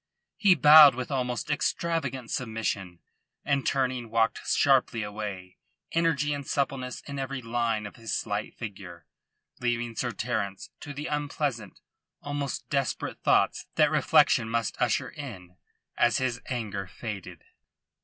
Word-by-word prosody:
He 195 -5 +5
bowed 150 -2 +9
with 125 +1 -5
almost 125 0 -2
extravagant 140 -5 -1
submission, 105 -7 -3 0.4
and 140 -2 +1
turning 130 -3 0
walked 115 0 +1
sharply 130 -5 +3
away, 100 -3 -6 0.3
energy 160 -3 +1
and 145 0 -4
suppleness 135 -3 -2
in 140 -1 -7
every 135 0 -3
line 115 -2 -1
of 100 - -9
his 115 -1 -6
slight 105 -1 -2
figure, 95 -7 -8 0.5
leaving 120 -1 -1
Sir 120 +2 -1
Terence 105 -3 -3
to 145 - -8
the 145 +1 -6
unpleasant, 145 -8 -3 0.4
almost 145 -1 -4
desperate, 140 -3 -2
thoughts - - +2
that - - +4
reflection 115 - +4
must 115 -1 -1
usher - - +1
in 95 -11 -9 0.4
as 120 -1 +3
his 125 -2 -1
anger 105 -6 -3
faded. 105 -1 -7
120 Hz, 130 wpm, -27 LUFS, 110-140 Hz, 0.5 s, bowed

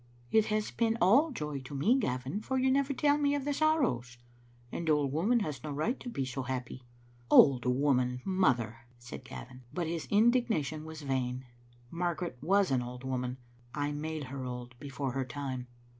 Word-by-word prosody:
" - - -28
It 220 -1 +5
has 215 0 -1
been 225 -1 +1
all 260 - +5
joy 150 - -4
to 130 +2 -9
me, 200 - +3
Gavin, 130 - -2
for 265 +4 -2
you 260 0 +3
never 275 +1 +2
tell 290 +2 +2
me 285 0 +2
of 280 -2 -3
the 290 - 0
sorrows. 205 - +1 0.5
An 165 -2 -3
old 145 -3 +2
woman 210 - +2
has 145 -9 -4
no 155 - -4
right 155 - -1
to 245 - -6
be 135 - -2
so 130 +1 -4
happy." 130 0 -4 0.5
"Old 130 -4 +7
woman, 125 -1 +2
mother!" 130 - +1
said 120 +1 -9
Gavin. 125 +1 -10
But 175 -2 -2
his 165 0 -3
indig 240 +4 +4
nation 155 -4 -1
was 160 -1 -8
vain. 130 -1 -2 0.5
Margaret 175 -4 -2
was 195 +2 +3
an 130 -2 +2
old 125 +1 -7
woman. 125 -1 -2 0.4
I 145 0 -1
made 155 +1 -4
her 130 0 -6
old 125 -1 -6
before 135 -1 -4
her 135 +1 -1
time. 130 -1 -5
145 Hz, 190 wpm, -31 LUFS, 130-205 Hz, 0.5 s, Old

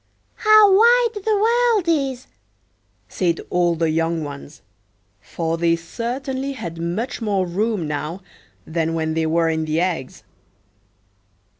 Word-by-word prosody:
"How 430 -2 +6
wide 460 0 +4
the 435 0 +1
world 460 -2 +2
is!" 275 -6 0 0.8
said 170 -3 -1
all 175 -1 +2
the 165 -1 0
young 165 0 -1
ones, 145 +1 -9 0.6
for 165 +9 -4
they 170 0 +3
certainly 260 - -4
had 170 -9 -7
much 195 +10 -3
more 200 -4 0
room 195 0 -1
now 150 +5 -4 0.4
than 165 0 -2
when 160 -1 -1
they 160 0 0
were 165 +1 +2
in 160 0 -2
the 155 +1 -1
eggs. 170 -8 -3
175 Hz, 130 wpm, -21 LUFS, 165-275 Hz, 0.8 s, How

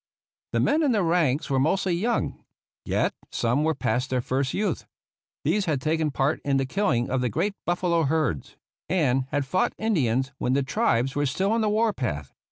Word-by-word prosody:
The - - +2
men 305 +3 +2
in 285 -5 +3
the 205 -4 +2
ranks 165 -5 +1
were 135 -3 +1
mostly 180 +6 +1
young; 225 +7 -1 0.4
yet - - +1 0.2
some 120 +6 0
were 160 0 +1
past 125 +1 -1
their 130 - +1
first 130 +2 -1
youth. 200 -6 -2 0.6
These 190 +7 +1
had 150 -5 0
taken 155 +3 0
part 135 +1 0
in 140 -1 +1
the 135 - +1
killing 130 - 0
of 130 -1 +1
the 125 - 0
great 190 - -1
buffalo 175 -1 +1
herds, 140 - -1 0.3
and 135 -7 +1
had 145 0 -1
fought 185 +8 0
Indians 135 - +1
when 125 - 0
the 140 +1 +2
tribes 135 - +1
were 145 0 +1
still 190 +9 0
on 230 0 +2
the 215 - +2
war 215 +1 +2
path. 75 - -4
150 Hz, 190 wpm, -25 LUFS, 130-190 Hz, 0.6 s, in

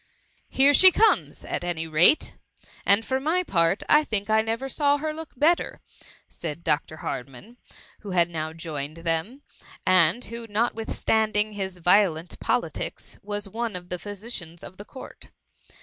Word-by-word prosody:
^^ - - -35 0.5
Here 275 +2 +5
she 375 +6 +10
comes, 445 +5 +2
at - - -4
any 170 -2 -3
rate! 165 - +3 0.5
and 200 +3 +4
for 260 0 -1
my 325 +6 0
part, 170 - +1
I 300 +1 +5
think 215 -5 -3
I 220 0 +4
never 225 +4 -3
saw 285 +1 +1
her 310 +1 -3
look 320 0 -9
bet 325 +6 +4
ter, - - -7 0.5
said 165 0 -7
Dr. 155 0 -1
Hardman, 135 - -7 0.4
who 205 - -10
had 175 -2 +2
now 160 -2 -4
joined 155 -2 -6
them, 170 - -2 0.4
and 185 +5 +4
wht), 230 0 -7
notwithstanding 215 -1 0
his 190 -2 -5
violent 175 -2 +2
politics, - - -3
was 205 0 -5
one 225 +1 -4
of 180 0 -7
the 180 - -4
physicians 200 -5 -7
of 185 - -11
the 205 - -10
Court. 260 - -12
205 Hz, 160 wpm, -25 LUFS, 170-240 Hz, 0.5 s, she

